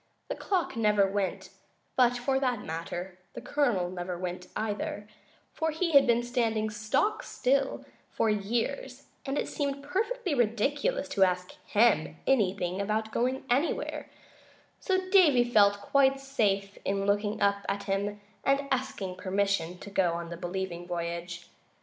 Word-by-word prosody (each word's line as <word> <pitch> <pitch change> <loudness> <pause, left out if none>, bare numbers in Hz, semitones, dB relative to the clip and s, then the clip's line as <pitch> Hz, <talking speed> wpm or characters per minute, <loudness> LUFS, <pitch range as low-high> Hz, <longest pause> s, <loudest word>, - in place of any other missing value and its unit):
The - - -2
clock 370 - -1
never 210 -3 +3
went, 195 0 -2 0.4
but, 245 -1 +4
for 265 +2 0
that 250 -5 0
matter, 175 +3 -5 0.2
the - - -4
Colonel 240 -12 +1
never 180 -1 -4
went 180 0 -5
either, 210 -1 -3 0.5
for 320 0 -1
he 330 +2 -1
had 280 -3 +7
been 240 0 +3
standing 225 -3 0
stock 265 - 0
still 270 +1 0 0.2
for - - 0
years, 220 - -2 0.2
and 275 +2 -1
it - - -1
seemed 280 -1 -3
perfectly 400 +5 -1
ridiculous 275 - +1
to 195 - +3
ask 180 -1 +1 0.2
him 205 -8 +3
anything 190 -6 +1
about 215 +2 -1
going 255 +3 -1
anywhere, 275 +7 0 0.7
so 375 -1 0
Davy 310 -11 +6
felt 205 -4 +4
quite 275 +4 +3
safe 200 -7 -1
in 195 0 -1
looking 205 +1 0
up 200 0 +2
at 200 0 -2
him 200 +1 -2 0.2
and 275 +1 +2
asking 210 -8 -2
permission 185 -2 0
to 200 - -10
go 185 -4 +2
on 170 0 -4
the 170 - -5
Believing 175 0 -4
Voyage. 170 0 -4
210 Hz, 145 wpm, -29 LUFS, 190-270 Hz, 0.7 s, had